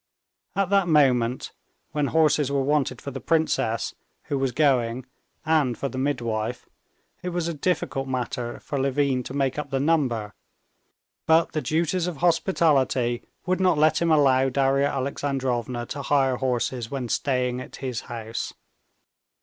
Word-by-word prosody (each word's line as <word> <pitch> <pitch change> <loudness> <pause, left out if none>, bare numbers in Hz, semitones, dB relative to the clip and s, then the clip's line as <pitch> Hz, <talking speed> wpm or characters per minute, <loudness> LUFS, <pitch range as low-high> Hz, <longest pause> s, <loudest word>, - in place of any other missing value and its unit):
At 195 -1 0
that 195 -3 +4
moment, 130 -6 +2 0.4
when 150 -2 0
horses 155 -3 +2
were 140 -1 +1
wanted 140 -3 0
for 140 - -6
the 135 - -6
princess, 160 -8 0 0.3
who 140 - -2
was 135 -1 0
going, 125 -3 +1 0.4
and 150 -7 +2
for 140 - -2
the 130 - -5
midwife, 120 -4 -2 0.5
it 180 - -3
was 175 -1 -2
a 170 - -2
difficult 145 -4 -1
matter 125 -2 -3
for 140 - -3
Levin 135 -1 +1
to 130 +2 -7
make 135 0 0
up 145 -1 -5
the 135 0 -1
number, 130 -9 +1 0.9
but 160 +1 +4
the 155 - -2
duties 170 +3 0
of 175 -4 -4
hospitality 145 -8 +2 0.2
would 185 0 0
not 185 -4 +3
let 155 +1 +3
him 170 - +2
allow 135 -3 +4
Darya 135 +1 +2
Alexandrovna 130 -3 -2
to 140 - -5
hire 135 -2 +2
horses 125 -2 -1
when 135 -3 -3
staying 125 0 0
in - - -8
his 130 -3 -4
house. 115 -1 -5
135 Hz, 150 wpm, -25 LUFS, 125-155 Hz, 0.9 s, that